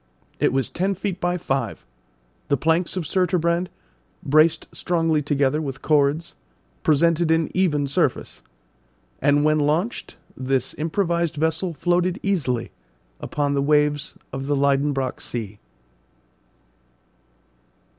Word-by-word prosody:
It - - +3
was 135 -2 -1
ten 190 +3 -1
feet 190 -1 -3
by 175 0 0
five; 135 -5 -3 0.6
the 140 - +2
planks 165 +6 +1
of 180 - -1
surturbrand, 175 0 +1 0.6
braced 155 +3 +3
strongly 165 -3 +1
together 145 +1 +1
with 135 -3 -6
cords, 150 +3 +2 0.5
presented 165 +2 +3
an 160 0 +2
even 160 -6 +1
surface, 140 - -1 0.8
and 145 +1 +3
when 155 0 +3
launched 155 +10 -1 0.2
this 130 0 -1
improvised 170 0 0
vessel 160 +3 -1
floated 175 +3 +1
easily 140 - -1 0.5
upon 145 -1 -1
the 140 - +1
waves 150 0 +1 0.2
of 135 0 -4
the 145 - +1
Liedenbrock 140 -1 0
Sea. 105 -4 -6
155 Hz, 115 wpm, -23 LUFS, 140-170 Hz, 0.8 s, It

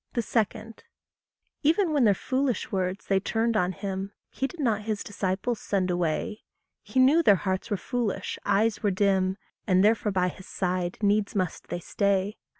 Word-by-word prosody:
2. 230 -1 +2 1.2
Even 325 +3 +2
when 280 -5 +4
their 205 -2 +5
foolish 260 +3 -1
words 185 0 -2
they 195 -1 +2
turned 225 +3 0
on 180 -3 +2
him, 195 0 -5 0.2
He 270 - -1
did 345 - -13
not 225 -7 +1
his 210 -1 -3
disciples 205 +4 -2
send 185 -2 0
away; 175 +4 -1 0.4
He 260 - -2
knew 280 +6 +6
their 205 -11 +6
hearts 190 +2 -2
were 205 - 0
foolish, 215 -4 -3
eyes 205 +1 +1
were 210 - +2
dim, 190 -1 +1 0.3
And 185 -1 +4
therefore 215 0 +3
by 180 -1 +1
his 190 - -12
side 180 -1 -2
needs 205 0 +2
must 185 -4 -2
they 175 - -4
stay. 200 +2 0
200 Hz, 165 wpm, -27 LUFS, 190-225 Hz, 1.2 s, knew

